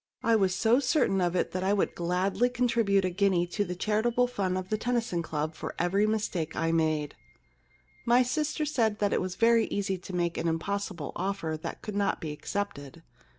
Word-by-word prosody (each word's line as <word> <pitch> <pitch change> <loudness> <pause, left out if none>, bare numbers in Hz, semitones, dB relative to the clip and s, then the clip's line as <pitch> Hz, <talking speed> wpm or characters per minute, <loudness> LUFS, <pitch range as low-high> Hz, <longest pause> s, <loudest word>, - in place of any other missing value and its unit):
I 230 0 +4
was 190 -4 +2
so 225 +6 +3
certain 250 - +2
of 175 0 +1
it - - 0
that 185 0 -2
I 195 +2 +2
would 205 - +1
gladly 185 +7 +1
con 250 0 0
tribute 200 -5 +2
a 185 - 0
guinea 185 -2 +2
to 190 +4 -1
the 180 -2 -5
charitable 220 +6 +1
fund 195 -7 -1
of 185 0 -5
the 215 - 0
Tennyson 235 -8 -1
Club 155 -1 -3
for - - -6
every 195 +5 +2
mistake 200 -7 -1
that - - -2
I 165 0 +1
made. 155 -3 0 0.5
* - - -33
My 255 - +5
sister 305 +4 -1
said 225 -8 +1
that 205 -1 +1
it - - +1
was 185 0 -3
very 230 +1 +4
easy 195 -2 -2
to 180 +1 -7
make 175 -1 -1
an 170 - -1
impossible 175 -1 -2
offer 185 -4 -2
that - - -6
could 210 - -5
not 200 -1 0
be 155 - -4
accepted. 165 -2 -5
195 Hz, 210 wpm, -28 LUFS, 175-220 Hz, 0.5 s, My